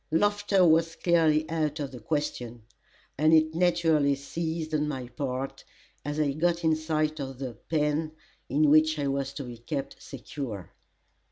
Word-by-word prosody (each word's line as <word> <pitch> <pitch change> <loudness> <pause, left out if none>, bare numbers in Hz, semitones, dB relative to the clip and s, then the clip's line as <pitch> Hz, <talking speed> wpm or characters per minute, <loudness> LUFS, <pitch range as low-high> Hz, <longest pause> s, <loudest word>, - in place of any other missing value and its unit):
Laughter 205 +2 +3
was 165 0 +3
clearly 160 -3 +3
out 155 -1 -1
of 140 -2 -3
the 125 - -9
question, 120 -5 -3 0.6
and 155 +1 +5
it 155 0 +3
naturally 165 -4 +3
ceased 160 +3 -4
on 150 -1 +1
my 130 -4 -4
part, 130 +1 -4 0.4
as 145 +2 -3
I 145 -2 +2
got 170 +3 0
in 160 -1 +3
sight 155 -1 -1
of 135 -2 -5
the 130 -2 -5 0.2
"pen" 155 0 0 0.4
in 145 +1 +3
which 155 0 +5
I 145 - -1
was 135 0 -1
to 140 0 -5
be 120 -2 -9
kept 140 +3 -5
secure. 125 - -7
155 Hz, 160 wpm, -28 LUFS, 140-160 Hz, 0.6 s, and